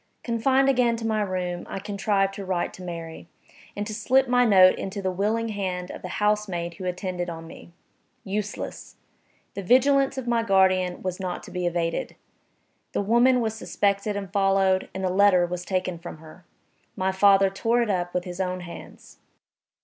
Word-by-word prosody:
Confined 260 +3 +2
again 250 -3 +3
to 225 0 -5
my 220 -1 0
room, 180 -3 -3
I - - -4
contrived 200 0 0
to 200 - -6
write 185 -2 -2
to - - -11
Mary, 165 -2 -7 0.5
and 205 - -3
to 215 - -5
slip 255 +5 +2
my 245 0 +4
note 185 -4 +6
into 195 +1 -4
the 190 -1 -1
willing 215 +5 -1
hand 185 -3 -3
of - - -9
the - - -6
housemaid 210 -5 0
who 185 - -7
attended 180 -1 -3
on 165 -1 -7
me. 165 +1 -13 0.5
Useless! 205 +1 -5 0.6
The 200 - -5
vigilance 270 +6 +3
of 260 -2 -4
my 235 -1 +2
guardian 185 -3 +2
was 185 0 -3
not 185 -2 -4
to - - -11
be 180 -1 -2
evaded. 170 -1 -2 0.8
The - - 0
woman 240 +4 +4
was 220 -1 -1
suspected 205 -1 -1
and 195 -2 -6
followed, 195 -1 +2
and 190 - -4
the 185 - +1
letter 190 -2 +5
was 180 0 -5
taken 185 -2 -2
from 170 -1 -8
her. 160 +3 -15 0.5
My 190 0 0
father 195 0 +4
tore 230 +5 +1
it 230 - -4
up 175 -2 -1
with 180 0 -2
his 180 0 -5
own 185 0 -2
hands. 170 -1 -12
195 Hz, 180 wpm, -25 LUFS, 180-215 Hz, 0.8 s, note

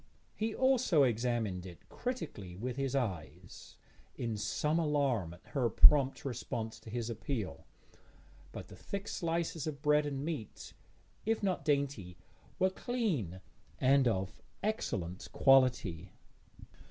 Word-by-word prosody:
He 220 0 -2
also 255 - +4
examined 115 -6 0
it 85 -4 -13
critically 105 - -5
with 120 +6 -4
his 135 -1 -1
eyes, 90 - -4 0.4
in 115 -2 -2
some 150 +9 0
alarm 140 - +1
at 90 - -22
her 125 -5 +1
prompt 135 +4 +6
response 115 -3 -4
to 110 - -12
his 115 0 -3
appeal, 115 -1 -4 0.8
but - - -8
the - - -10
thick 200 0 -5
slices 165 -2 -2
of 145 -1 -5
bread 150 0 +4
and 140 0 -3
meat, 155 -11 -5 0.5
if 225 0 0
not 190 -3 0
dainty, 140 - 0 0.4
were 185 0 +3
clean, 185 - -2 0.4
and 135 0 +5
of 95 -4 -1 0.2
excellent 95 - -2
quality. 125 - +3
130 Hz, 125 wpm, -33 LUFS, 105-155 Hz, 0.8 s, prompt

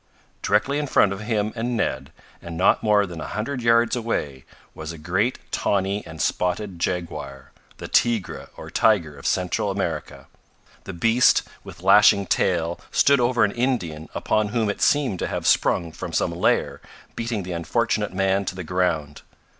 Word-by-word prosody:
Directly 135 +8 +1
in 150 - -2
front 100 -6 +3
of 100 - -7
him 110 -1 -1
and 120 +1 -2
Ned, 65 -10 -2 0.3
and 85 -1 -7
not - - +3
more 105 -2 +3
than 85 -4 -8
a - - -5
hundred 125 +5 -4
yards 115 0 +3
away, 75 - -3 0.3
was 80 0 -7
a 85 - -9
great 95 +10 -1
tawny 100 +1 0
and 80 -1 -10
spotted 90 +4 -1
jaguar 75 -7 -4 0.3
the - - -7
"tigre" 115 -7 0
or - - -9
tiger 85 -9 +2
of 70 - -6
Central 95 +3 0
America. 85 -6 -4 0.6
The 95 - -6
beast, 115 +8 +3 0.2
with 85 +1 -12
lashing 100 +1 +6
tail, 85 -2 0
stood 140 -1 +4
over 120 -1 +2
an 105 - +2
Indian 90 - -2
upon 110 -1 0
whom 110 -1 0
it - - -9
seemed 135 -11 +2
to - - -2
have - - -4
sprung 85 -2 +2
from - - -7
some - - +1
lair, - - 0 0.3
beating 115 -3 -3
the 90 - -7
unfortunate 85 -2 -1
man 95 +1 +1
to 90 - -4
the 90 - -6
ground. 80 -4 -1
100 Hz, 170 wpm, -23 LUFS, 85-115 Hz, 0.6 s, lashing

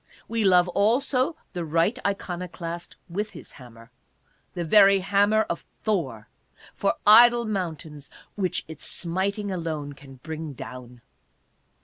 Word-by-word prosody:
We 230 -1 -1
love 180 -2 +5
also 255 - +1 0.2
the 175 - -3
right 165 +9 +1
iconoclast 175 -3 -4
with 205 +5 -3
his - - -11
hammer, 115 -2 -15 0.6
the 175 - -2
very 195 +3 +6
hammer 205 +3 +3
of 170 - -5 0.2
Thor, 145 - -2 0.5
for - - 0
idol 235 +2 +7
mountains 160 -8 -5 0.2
which 185 -4 -2
its 160 -2 -11
smiting 195 +4 -2
alone 160 -5 -4
can 140 -1 -14
bring 155 +2 -7
down. 125 -1 -10
180 Hz, 120 wpm, -25 LUFS, 155-205 Hz, 0.6 s, idol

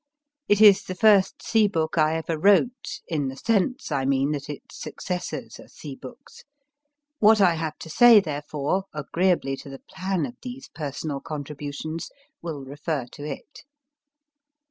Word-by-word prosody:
It 205 +1 +3
is 205 -3 +8
the 185 - -7
first 200 -1 +4
sea 220 -2 +3
book 160 -5 -1
I 155 -1 +3
ever 160 0 -2
wrote, 205 - +2
in 150 -5 -1
the 130 - -5
sense, 225 - 0
I 140 -2 0
mean, 135 +1 +1
that 145 -1 -4
its 145 - -9
successors 180 -1 -5
are - - -13
sea 145 -3 -9
books: 245 - -13 0.8
what 215 0 +6
I 185 -4 +5
have 160 -2 -4
to 160 - -10
say, 240 +4 +8
therefore, 150 +1 -2
agreeably 155 -1 0
to 140 - -10
the 135 -1 -10
plan 190 -1 -2
of 245 - -9
these 255 +1 -8
personal 145 -1 -5
contributions, 150 +1 -6 0.3
will 150 -5 -6
refer 145 0 -3
to 145 - -10
it. 150 - -8
160 Hz, 155 wpm, -25 LUFS, 145-200 Hz, 0.8 s, is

